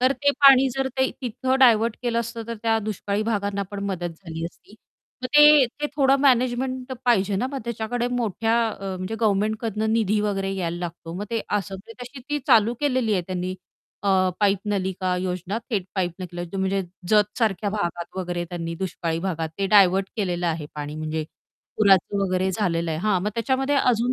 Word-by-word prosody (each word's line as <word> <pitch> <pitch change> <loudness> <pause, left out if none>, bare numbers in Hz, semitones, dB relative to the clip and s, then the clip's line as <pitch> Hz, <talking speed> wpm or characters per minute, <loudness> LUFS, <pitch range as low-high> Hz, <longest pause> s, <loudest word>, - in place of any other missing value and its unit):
तर 255 +2 +4
ते 285 0 +1
पाणी 270 -1 +8
जर 270 0 -1
ते 260 - +2
तिथं 260 +1 -1
डायव्हर्ट 230 -3 +5
केलं 235 -1 0
असतं, 235 0 -5
तर 230 - -4
त्या 225 -1 +2
दुष्काळी 210 -1 -2
भागांना 200 -2 -1
पण 200 -1 -5
मदत 180 -3 -2 0.2
झाली 165 -1 -5
असती. 175 +4 -11 0.5
मग - - 0
ते 295 -2 +8 0.2
ते 295 - +1
थोडं 275 -1 +4
मॅनेजमेंट 255 0 +1
पाहिजे 205 -5 +2
ना, 245 - 0
मग 275 - -2
त्याच्याकडे 235 +1 -2
मोठ्या 225 -2 0
अ, 195 -3 -5
म्हणजे 185 +4 -4
गव्हर्नमेंटकडनं 215 +1 0
निधी 215 -2 +2
वगैरे 195 -2 -1
यायला 175 -3 -2
लागतो, 170 -1 -6
मग 195 +3 -4
ते 230 -1 0
असं. 200 -1 -2
म्हणजे 225 +6 -11
तशी 250 +2 -9
ती 295 - +1
चालू 225 +2 +5
केलेली 255 -6 +1
आहे 185 -3 +1
त्यांनी 185 0 -3 0.5
अ, 200 - 0 0.3
पाईप 200 -1 +3
नलिका 190 -2 -1
योजना, 185 +3 -3
थेट 205 -6 0
पाईप 180 -3 0
नकलं 175 -1 -6
जो 195 - -3
म्हणजे 190 +1 0 0.3
जत 210 +1 +2
सारख्या 210 -3 0
भागात 175 -4 -4
वगैरे, 175 -2 -3
त्यांनी 170 -1 -5
दुष्काळी 165 -2 -3
भागात 165 -3 -2
ते 195 - +1
डायव्हर्ट 195 -1 +5
केलेलं 180 -4 -1
आहे 160 -3 -2
पाणी. 150 0 -5
म्हणजे 155 0 -3 0.5
पुराचं 200 -1 +4
वगैरे 185 -1 0
झालेलं 170 -4 -1
आहे 155 - -2
हां, 195 -1 +1
मग 205 - 0
त्याच्यामध्ये 265 +4 0
अजून 245 -2 +2
205 Hz, 185 wpm, -24 LUFS, 185-235 Hz, 0.5 s, पाणी